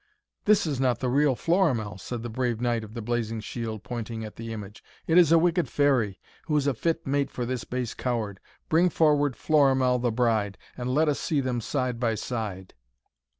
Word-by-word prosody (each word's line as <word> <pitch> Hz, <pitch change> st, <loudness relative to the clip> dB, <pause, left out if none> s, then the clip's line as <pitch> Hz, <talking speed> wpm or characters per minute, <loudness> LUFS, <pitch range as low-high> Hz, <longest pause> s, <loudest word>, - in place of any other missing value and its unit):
'This 210 Hz, -3 st, +4 dB
is 145 Hz, -5 st, -2 dB
not 130 Hz, -2 st, +2 dB
the 130 Hz, -, -1 dB
real 140 Hz, 0 st, +3 dB
Florimell!' 140 Hz, -, +1 dB
said 115 Hz, +4 st, -5 dB
the -, -, -3 dB
brave 120 Hz, -1 st, -1 dB
knight 120 Hz, -2 st, 0 dB
of 110 Hz, +1 st, -11 dB
the 115 Hz, -, -5 dB
blazing 115 Hz, -1 st, -2 dB
shield, 110 Hz, -1 st, -5 dB
pointing 115 Hz, 0 st, -5 dB
at 105 Hz, -, -9 dB
the 115 Hz, 0 st, -7 dB
image. 105 Hz, -2 st, -8 dB, 0.2 s
'It 160 Hz, -, +1 dB
is 175 Hz, -3 st, +6 dB
a 165 Hz, -, +7 dB
wicked 170 Hz, +1 st, +2 dB
fairy, 125 Hz, -9 st, +2 dB, 0.3 s
who 150 Hz, -2 st, +2 dB
is 140 Hz, -, +1 dB
a 140 Hz, -, +2 dB
fit 165 Hz, +7 st, -1 dB
mate 140 Hz, 0 st, 0 dB
for 125 Hz, -, -4 dB
this 125 Hz, 0 st, -3 dB
base 125 Hz, -2 st, -3 dB
coward. 110 Hz, -6 st, -3 dB, 0.3 s
Bring 170 Hz, +3 st, +4 dB
forward 145 Hz, -5 st, +2 dB
Florimell 135 Hz, -4 st, +3 dB
the 120 Hz, -1 st, 0 dB
bride, 110 Hz, -4 st, +1 dB, 0.2 s
and 125 Hz, 0 st, -3 dB
let 155 Hz, +4 st, +3 dB
us 150 Hz, -, +1 dB
see 155 Hz, -4 st, 0 dB
them 125 Hz, -3 st, -1 dB
side 125 Hz, -1 st, -2 dB
by 115 Hz, -2 st, +1 dB
side!' 105 Hz, -5 st, -5 dB
125 Hz, 200 wpm, -27 LUFS, 115-145 Hz, 0.3 s, a